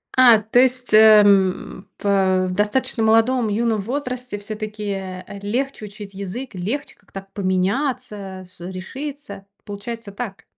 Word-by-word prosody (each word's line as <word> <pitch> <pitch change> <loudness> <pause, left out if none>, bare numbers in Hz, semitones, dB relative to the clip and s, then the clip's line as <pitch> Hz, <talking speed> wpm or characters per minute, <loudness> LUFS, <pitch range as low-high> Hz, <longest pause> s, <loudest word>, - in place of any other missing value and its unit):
А, 245 -3 +8
то 220 +3 +2
есть, 255 -2 +1
э, 215 -1 +9
м, 190 -1 +1
пэ 190 -2 +2
в - - -3
достаточно 210 +4 0
молодом, 225 +2 +3
юном 220 0 0
возрасте, 250 -1 -4
всё-таки, 215 +1 -6
э, 190 -2 -4
э, 200 - -8
легче 240 +3 -2
учить 205 -1 -10
язык, 200 +7 -6
легче 220 +11 -4
как-то 195 0 -11
поменяться, 200 0 -2
с - - -24
решиться? 200 +4 -7 0.2
Получается 205 +1 -7
так. 200 -1 -7
210 Hz, 135 wpm, -21 LUFS, 195-245 Hz, 0.2 s, э